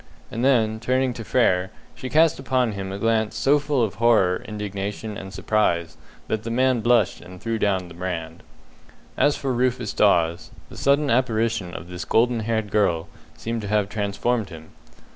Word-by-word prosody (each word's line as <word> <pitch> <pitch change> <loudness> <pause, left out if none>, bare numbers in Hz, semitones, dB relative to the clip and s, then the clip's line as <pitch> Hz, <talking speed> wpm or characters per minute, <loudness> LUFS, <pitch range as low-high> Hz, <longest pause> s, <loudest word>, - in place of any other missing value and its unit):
and 115 - -3
then, 110 -5 +3
turning 130 +2 0
to 115 - -7
Frere, 95 -6 +2 0.2
she 130 - -7
cast 160 0 +3
upon 130 -2 +1
him 95 -1 -5
a 95 - -4
glance 110 0 0
so 145 +2 +3
full 140 -3 0
of 110 - -1
horror, 110 -6 +3
indignation, 105 0 -5
and 95 -1 -8
surprise, 85 -6 0 0.3
that 110 - -1
the 115 - -6
man 130 +1 +2
blushed 115 -3 +2
and 90 0 -12
threw 115 +2 -2
down 95 -3 0
the 85 - -12
brand. 85 -2 -5 0.7
As 145 - +2
for 135 -2 -2
Rufus 125 -3 0
Dawes, 85 -5 +2 0.2
the - - -12
sudden 140 0 +2
apparition 115 -6 0
of 80 - -7
this 90 0 -6
golden 120 +1 +2
haired 110 -2 -2
girl 90 -6 +1 0.3
seemed 115 +8 -3
to 105 - -5
have 105 -1 +1
transformed 105 +2 -1
him. 80 -2 -12
110 Hz, 175 wpm, -23 LUFS, 95-120 Hz, 0.7 s, then